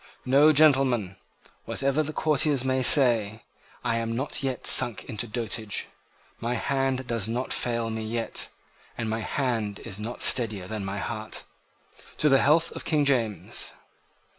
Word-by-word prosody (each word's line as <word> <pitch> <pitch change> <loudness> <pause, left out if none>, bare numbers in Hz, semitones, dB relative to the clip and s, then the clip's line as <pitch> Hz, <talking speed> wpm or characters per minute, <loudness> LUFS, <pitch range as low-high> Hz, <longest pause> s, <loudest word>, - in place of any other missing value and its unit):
"No, 140 +4 +5
gentlemen; 130 -10 +3 0.5
whatever 140 +2 0
the 155 0 -3
courtiers 150 -3 +1
may 130 0 +1
say, 115 -5 +4 0.4
I 115 - 0
am 115 0 -2
not 135 +3 -3
yet 135 -2 -3
sunk 120 - +6
into 110 +2 -5
dotage. 110 -2 -3 0.5
My 120 +2 -2
hand 135 +1 -1
does 115 -4 -1
not 120 +3 -2
fail 115 -2 -2
me 110 0 -4
yet: 115 +1 -3 0.5
and 115 - -3
my 110 +1 -2
hand 115 -5 -2
is 105 -3 -7
not 115 +3 -4
steadier 110 -7 +2
than 110 0 -5
my 95 +1 -4
heart. 110 +1 -4 0.7
To 150 - +2
the 135 -1 +4
health 165 +3 +3
of - - -8
King 150 -3 +1
James!" 115 -7 -1
120 Hz, 150 wpm, -26 LUFS, 110-135 Hz, 0.7 s, sunk